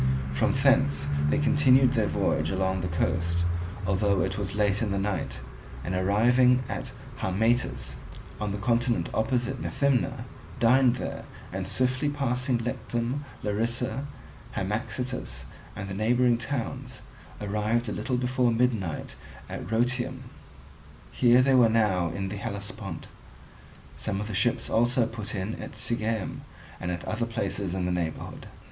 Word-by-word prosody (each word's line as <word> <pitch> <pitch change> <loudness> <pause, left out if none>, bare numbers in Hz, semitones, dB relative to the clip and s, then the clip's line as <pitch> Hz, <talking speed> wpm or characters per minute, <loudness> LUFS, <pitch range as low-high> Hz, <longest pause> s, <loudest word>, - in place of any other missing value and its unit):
From 65 - +2
thence 70 0 +3 0.2
they 75 - +2
continued 130 - +5
their 110 -5 +2
voyage - - +1
along 95 -1 0
the 90 - -1
coast, 85 0 0 0.4
although 100 +1 +2
it 95 0 0
was 100 -1 -3
late 105 0 +2
in 110 - 0
the 100 - 0
night, 100 -2 -2 0.4
and 90 - -3
arriving 120 +7 +4
at - - -4 0.3
Harmatus 100 - 0 0.4
on 105 -1 -2
the 100 - -2
continent 120 +3 +1
opposite 125 +3 0
Methymna, 130 -3 0 0.3
dined 125 +1 +5
there; - - -5 0.3
and 95 0 -3
swiftly 130 +7 +1
passing 130 -3 0
Lectum, 120 +3 -2 0.2
Larisa, 120 +6 -1 0.5
Hamaxitus, 105 - -3 0.3
and 100 -1 -5
the 95 - -5
neighbouring 120 +4 +3
towns, 120 0 -4 0.4
arrived 105 +3 0
a - - -2
little 125 +4 -1
before 125 -1 +2
midnight 115 -9 0 0.3
at - - -6
Rhoeteum. 125 +3 0 0.9
Here 125 0 +5
they 135 0 +4
were 125 -3 +6
now 105 -6 +2
in 95 +3 -3
the 105 - -5
Hellespont. 100 -3 -5 0.9
Some 95 - -2
of 105 - -2
the 110 - -5
ships 110 +5 +1
also 120 +1 +3
put 110 -2 -5
in 100 +3 -3
at - - -7
Sigeum 110 -3 -1 0.4
and 90 - -3
at 90 -1 -3
other 115 +2 -1
places 100 -4 -2
in 90 -1 -1
the 90 - 0
neighbourhood. 85 -3 -3
110 Hz, 140 wpm, -27 LUFS, 95-125 Hz, 0.9 s, were